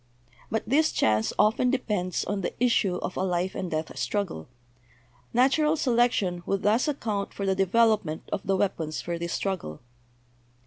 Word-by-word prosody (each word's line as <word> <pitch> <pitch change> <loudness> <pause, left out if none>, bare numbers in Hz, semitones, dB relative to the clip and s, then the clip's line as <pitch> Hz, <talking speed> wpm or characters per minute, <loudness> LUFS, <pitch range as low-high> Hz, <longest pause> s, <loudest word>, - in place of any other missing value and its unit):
But 220 0 -2
this 305 +6 +3
chance 110 0 +2
often 220 +4 +3
depends' 210 -9 -1
on 200 0 -2
the - - -3
issue 230 -6 +2
of - - -4
a - - -2
life 180 0 0
and 185 - -4
death 155 0 -3
struggle. 200 - -2 0.8
Natural 300 +5 +3
selec 245 -5 +2
tion 180 -4 -1
would 195 - -1
thus 220 +7 +3
account 220 -9 -2
for 200 - -3
the 190 - +2
development 195 -3 +2
of - - -1
the 195 0 +2
weap 195 -2 0
ons 155 0 -4
for 170 -1 -4
this 170 0 -3
struggle. 185 - -3
200 Hz, 170 wpm, -27 LUFS, 180-235 Hz, 0.8 s, this